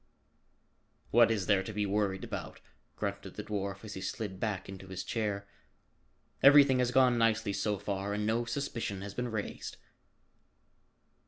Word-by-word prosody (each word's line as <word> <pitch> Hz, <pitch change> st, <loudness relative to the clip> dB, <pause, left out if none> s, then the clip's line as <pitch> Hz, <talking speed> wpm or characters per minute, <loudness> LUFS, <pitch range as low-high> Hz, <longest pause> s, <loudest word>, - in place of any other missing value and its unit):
"What 115 Hz, 0 st, +6 dB
is 105 Hz, -4 st, 0 dB
there 100 Hz, 0 st, +3 dB
to 95 Hz, -, -6 dB
be 105 Hz, 0 st, 0 dB
worried 100 Hz, -1 st, 0 dB
about?" -, -, -6 dB, 0.4 s
grunted 100 Hz, -2 st, -4 dB
the 105 Hz, -, -5 dB
dwarf 100 Hz, -1 st, -4 dB
as 105 Hz, -, -7 dB
he 95 Hz, -, -6 dB
slid 95 Hz, 0 st, -4 dB
back 105 Hz, -3 st, -2 dB
into 95 Hz, 0 st, -9 dB
his 95 Hz, -1 st, -5 dB
chair. 105 Hz, -3 st, -2 dB, 0.9 s
"Everything 140 Hz, -2 st, +7 dB
has 125 Hz, -1 st, +2 dB
gone 125 Hz, -1 st, +4 dB
nicely 110 Hz, -2 st, +2 dB
so 105 Hz, 0 st, 0 dB
far 100 Hz, 0 st, -3 dB
and 105 Hz, 0 st, -1 dB
no 115 Hz, +2 st, +1 dB
suspicion 115 Hz, -6 st, -3 dB
has 100 Hz, -, -6 dB
been 125 Hz, 0 st, -2 dB
raised." 110 Hz, -2 st, -5 dB
105 Hz, 155 wpm, -31 LUFS, 100-115 Hz, 0.9 s, Everything